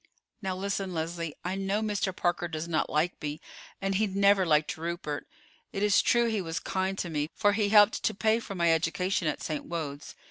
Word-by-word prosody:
"Now 190 -2 -2
listen, 195 -1 -2
Leslie. 165 -1 -3
I 180 - -1
know 195 +2 -1
Mr. 205 -2 0
Parker 175 -2 -1
does 160 0 -4
not 160 -2 0
like 155 +4 0
me, 150 0 -4 0.4
and 195 0 -1
he 210 +3 +2
never 200 -1 +3
liked 150 -1 +2
Rupert. 165 -2 -4 0.4
It 195 - -2
is 205 -1 +5
true 240 0 +3
he 220 -3 0
was 165 -2 -3
kind 190 0 -2
to 175 - -3
me, 150 0 -1
for 205 -2 +3
he 205 -1 +1
helped 210 0 +6
to - - 0
pay 220 +3 +2
for 200 -4 -7
my 170 -2 +3
education 170 +2 0
at 150 - -2
St. 155 -2 -3
Wode's. 150 -4 -5
185 Hz, 205 wpm, -29 LUFS, 165-200 Hz, 0.4 s, helped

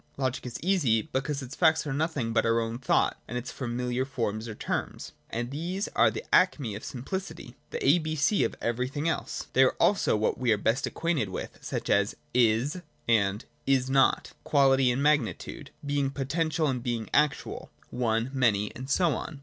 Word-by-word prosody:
Logic 130 -2 -1
is 120 - -5
easy, 145 - +2
because 140 +1 -2
its 130 +1 -8
facts 160 -2 +3
are 145 - -2
nothing 140 -6 -1
but 115 - +3
our 115 0 +2
own 115 +1 -3
thought 130 - +2
and 120 - -4
its 125 - -5
familiar 125 0 -2
forms 115 -4 -3
or 110 - -6
terms: - - -4 0.2
and 120 +2 -3
these 175 +8 -3
are - - +4
the 435 - -6
acme 145 - +3
of 100 - -7
simplicity, 185 +10 -6
the 470 -4 -4
a 175 - +6
b 155 -1 -3
c 155 +8 +2
of - - -1
every 120 +2 -1
thing 145 +4 -3
else. 165 - -2
They 130 - +5
are 130 - +4
also 200 - +3
what 105 - 0
we 125 -2 +2
are 105 - +4
best 115 +6 0
acquainted 165 - -1
with: 95 - -6
such - - -4
as, - - +2 0.2
'Is' 125 +8 +2 0.3
and 105 -2 +2 0.2
'Is 130 -1 +2
not': 135 0 +3
quality 135 -3 +4
and 125 +3 0
magni 150 -6 +3
tude: - - -9 0.2
being 140 -1 0
potential 155 +4 -1
and 130 -4 0
being 115 -3 -2
actual: 150 -2 0 0.2
one, 120 0 0
many, 105 -6 +1
and 130 +2 -7
so 170 +1 +3
on. 155 -3 -6
130 Hz, 190 wpm, -28 LUFS, 115-150 Hz, 0.3 s, a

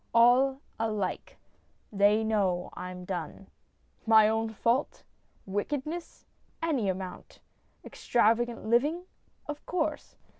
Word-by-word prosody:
All 255 +3 +5 0.2
alike. 215 -4 -3 0.5
They 205 +2 +3
know 195 -5 0
I'm 180 0 -7
done. 180 +1 -6 0.6
My 220 -1 +7
own 225 +1 0
fault? 235 +5 -1 0.4
Wickedness? 290 - -4 0.3
Any 280 -11 0
amount. 185 0 -6 0.5
Extravagant 235 0 +1
living? 290 +10 +2 0.4
Of 295 0 -6
course. 315 -4 -2
225 Hz, 90 wpm, -29 LUFS, 200-265 Hz, 0.6 s, My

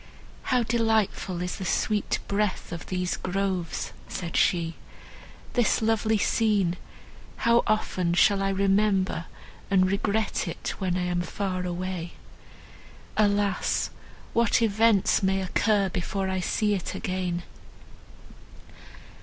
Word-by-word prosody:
"How 250 -2 +2
delightful 220 -6 0
is 180 - -4
the - - -5
sweet 210 +3 0
breath 200 -3 -1
of 170 -2 -6
these 180 -1 -1
groves," 185 - -2
said 170 +9 -5
she. 170 -3 +2 0.8
"This 240 -2 +2
lovely 220 0 +2
scene!—how 210 +3 0
often 185 -5 0
shall 200 +2 +4
I 195 - +1
remember 195 -2 +1 0.4
and 185 -1 +3
regret 210 +2 0
it, - - -4
when 185 -2 0
I 180 - -1
am 175 0 0
far 185 +1 -3
away. 175 -1 -4 1.0
Alas! 205 -2 +1 0.4
what 235 0 +3
events 220 -1 +3
may 190 0 +2
occur 195 +2 +2
before 190 +2 -2
I 190 0 -1
see 210 +3 +1
it 190 -4 -3
again! 185 -4 -2
195 Hz, 110 wpm, -26 LUFS, 180-210 Hz, 1.0 s, shall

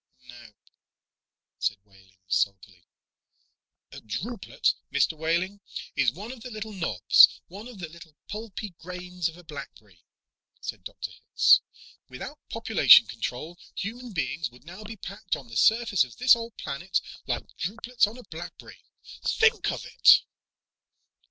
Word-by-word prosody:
"Nope," 120 -3 -16 0.9
said 110 - 0
Wehling 95 -2 -23
sulkily. 95 -1 -1 1.0
"A - - -10
drupelet, 195 - -1 0.2
Mr. 160 - +2
Wehling, 170 +5 -1 0.4
is 125 - +3
one 205 - -8
of 255 -3 -10
the 250 - -7
little 215 -1 -6
knobs, 165 - +5
one 200 +6 -9
of 245 -4 -11
the 175 -3 -6
little 160 -1 -14
pulpy 210 0 -6
grains 180 -1 -4
of 165 - -13
a 175 - -14
blackberry," 110 - -11 0.6
said - - -6
Dr. - - -7
Hitz. - - +4 0.5
"Without - - -8
population - - +7
control, 160 +8 -5 0.2
human 240 +4 -5
beings 160 -4 -2
would 125 +3 -19
now 180 +6 -10
be 225 +2 -8
packed 195 0 -4
on 130 -4 -11
this 115 - +1
surface 220 -5 +4
of 125 -3 -11
this 250 0 +7
old 230 -1 -8
planet 155 +7 -2 0.3
like - - -4
drupelets 230 +5 0
on 220 +4 -9
a 250 - -11
blackberry! 175 -2 -10 0.4
Think 450 +1 +3
of - - -6
it!" - - +6
175 Hz, 140 wpm, -27 LUFS, 130-215 Hz, 1.0 s, population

